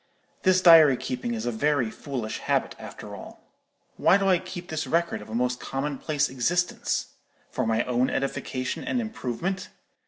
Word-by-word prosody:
This 185 -1 +4
diary 160 -7 +8
keeping 120 -2 -3
is 110 +1 -4
a 120 - 0
very 130 -1 +1
foolish 125 -6 -5
habit, - - 0
after - - -9
all. - - -11 0.6
Why 195 - +5
do 195 -1 0
I 185 -2 +4
keep 175 0 -8
this 155 0 -3
record 170 -6 0
of 105 - -12
a 110 - -5
most 125 +1 0
commonplace 145 +2 -1
existence? 170 +8 -1 0.4
For - - -1
my 115 +1 +2
own 125 +1 +1
edification 130 -1 -3
and 255 - -1
improvement? 190 - -3
140 Hz, 160 wpm, -26 LUFS, 125-175 Hz, 0.6 s, diary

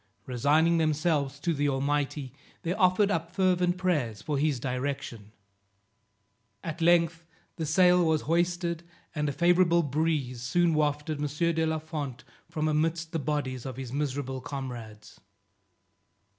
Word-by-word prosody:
Resigning 150 +7 +3
themselves 155 -3 0
to 170 +1 0
the 145 -1 +1
Almighty, 140 -1 -1 0.3
they 170 - 0
offered 195 +1 +3
up 165 -1 -1
fervent 180 -2 +2
prayers 150 - 0
for 145 +2 -2
his 145 -3 +1
direction. 125 -4 -4 1.3
At 165 0 -5
length 165 -1 +3 0.3
the 160 -3 -2
sail 180 +2 +5
was 160 -2 +2
hoisted, 170 +1 0 0.3
and 150 -2 -1
a - - 0
favorable 170 +2 +3
breeze 145 -4 -1
soon 170 +7 +2
wafted 150 0 0
M. 150 - 0 0.3
de 160 0 +1
la 160 0 0
Fond 150 -5 -5 0.3
from 155 0 -1
amidst 160 +2 0
the 165 - -1
bodies 135 -3 -2
of 130 -2 -6
his 130 -2 -6
miserable 135 -2 -2
comrades. 120 -7 -7
155 Hz, 135 wpm, -28 LUFS, 135-170 Hz, 1.3 s, sail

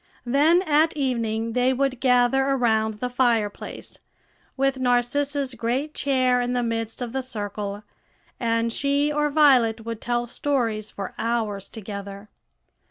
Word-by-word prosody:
Then 300 +8 +4
at 310 -1 +2
evening 230 -4 -1
they 250 +1 +2
would 265 -1 -1
gather 250 +1 +3
around 220 -5 +1
the 250 +4 -3
fireplace, 235 -5 -1 0.6
with 270 0 +1
Narcissa's 260 +2 0
great 245 +6 -2
chair 255 -3 +1
in 245 0 -1
the 245 -1 0
midst 225 +1 -3
of 240 -1 -6
the 265 - -1
circle, 205 -4 -5 0.6
and 230 -1 0
she 285 +3 +1
or 295 0 +1
Violet 255 -7 +4
would 230 -1 -5
tell 240 0 -1
stories 235 -5 -1
for 195 -2 -7
hours 220 -4 -2
together. 200 -1 -8
245 Hz, 135 wpm, -24 LUFS, 225-270 Hz, 0.6 s, Then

